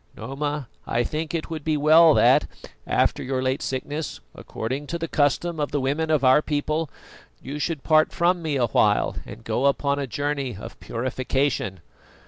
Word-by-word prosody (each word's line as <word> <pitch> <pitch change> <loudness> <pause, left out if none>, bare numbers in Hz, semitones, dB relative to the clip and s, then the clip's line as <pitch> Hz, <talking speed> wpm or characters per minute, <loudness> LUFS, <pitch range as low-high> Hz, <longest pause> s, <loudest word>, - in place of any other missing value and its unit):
Noma, 140 +3 -4 0.2
I 120 +1 +1
think 155 +5 -3
it 165 0 -4
would 155 -2 -5
be 155 0 0
well 155 +2 +6
that, - - +5 0.4
after - - +1
your 130 0 -2
late 130 +3 0
sickness, 145 +4 -4
according 130 +6 -5
to 170 - -3
the 165 0 -4
custom 155 +3 0
of 145 - -1
the 145 - -1
women 145 +4 -1
of 155 -3 +2
our 130 +3 +6
people, 155 +1 -1 0.5
you 145 +2 -6
should 150 -1 -2
part 155 -1 +4
from 175 +1 +1
me 155 -3 -2
a 125 -3 +2
while, 105 -2 +2
and 105 +3 -10
go 120 +5 +1
upon 140 0 +1
a 140 - -2
journey 140 -3 -2
of - - -10
purification." 130 - -2
145 Hz, 175 wpm, -24 LUFS, 130-155 Hz, 0.5 s, well